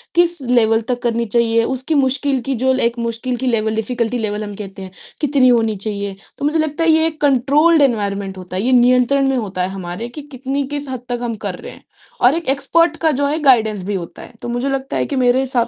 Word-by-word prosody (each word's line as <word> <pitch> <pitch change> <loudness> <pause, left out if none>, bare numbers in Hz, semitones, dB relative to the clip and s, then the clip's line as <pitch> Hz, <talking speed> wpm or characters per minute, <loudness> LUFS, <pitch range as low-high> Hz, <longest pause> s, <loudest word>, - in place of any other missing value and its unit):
किस 345 -3 +3
लेवल 230 -3 +2
तक 245 0 -1
करनी 235 0 0
चाहिए 230 +1 +2
उसकी 260 +5 -2
मुश्किल 270 -1 +1
की 270 - 0
ल - - -5
जो 260 +2 +2
एक 235 -2 0
मुश्किल 235 +2 -2
की 260 +1 -3
लेवल, 220 -2 0
डिफिकल्टी 235 +1 -1
लेवल 215 -1 -3
हम 205 -1 -6
कहते 195 -2 -8
हैं 190 -1 -8 0.3
कितनी 280 -3 +3
होनी 225 -3 +2
चाहिए। 200 -1 -4 0.2
तो 285 - -3
मुझे 310 +2 +1
लगता 310 +1 -1
है 330 - +3
ये 320 0 +4
एक 315 -1 -6
कंट्रोल्ड 290 +4 +4
एनवायरनमेंट 200 -6 0
होता 185 0 -8
है, - - 0
ये 255 - +1
नियंत्रण 250 +2 +4
में 265 - +1
होता 195 -5 -3
है 185 - -1
हमारे 190 +4 -6
कि 295 +5 -9
कितनी 270 +2 -3
किस 290 -1 -5
हद 255 -2 -5
तक 245 -1 -2
हम 230 -2 -2
कर - - -2
रहे - - -9
हैं - - -17 0.4
और 250 +6 +5
एक 335 -3 -4
एक्सपर्ट 320 +4 +2
का 320 -1 +3
जो 285 - +2
है 305 +3 -1
गाइडेंस 220 -7 +3
भी 205 - -2
होता 170 -3 -7
है। - - -12
तो 240 - -5
मुझे 245 +3 -1
लगता 270 0 -2
है - - 0
कि 280 - -4
मेरे 250 0 +3
हिसाब 250 -3 0
245 Hz, 245 wpm, -18 LUFS, 220-275 Hz, 0.4 s, और